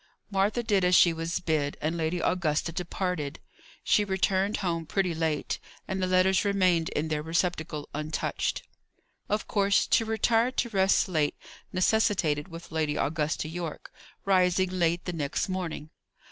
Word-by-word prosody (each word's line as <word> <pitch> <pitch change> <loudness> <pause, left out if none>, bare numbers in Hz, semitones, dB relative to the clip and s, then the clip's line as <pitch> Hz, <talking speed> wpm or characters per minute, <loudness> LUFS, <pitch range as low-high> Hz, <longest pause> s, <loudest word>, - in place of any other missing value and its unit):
Martha 205 +5 +1
did 205 -4 +2
as 180 0 +4
she 170 -1 +6
was 165 +2 -2
bid, 155 -5 -1
and 155 +3 -1
Lady 165 +1 -1
Augusta 165 -2 0
departed. 175 -3 -3 0.4
She 210 - +3
returned 195 +1 +1
home 165 -4 -2
pretty 185 -1 0
late, 160 -2 -1 0.3
and 190 0 -2
the 185 - +1
letters 185 +1 +3
remained 185 -5 +2
in 155 +2 -2
their 150 -1 -1
receptacle 160 -2 -2
untouched. 150 +1 -2 0.7
Of 210 +1 -1
course, 200 -1 +2
to - - +3
retire 225 +2 +2
to 240 - -1
rest 195 -2 +3
late, 155 -5 0 0.4
necessitated, 185 -6 +1
with 165 -1 -10
Lady 155 -2 0
Augusta 155 +1 -1
Yorke, 165 -1 -6 0.3
rising 185 -1 +3
late 175 -1 0
the 180 - -3
next 145 -4 -2
morning. 175 -5 -4
175 Hz, 145 wpm, -28 LUFS, 160-190 Hz, 0.7 s, she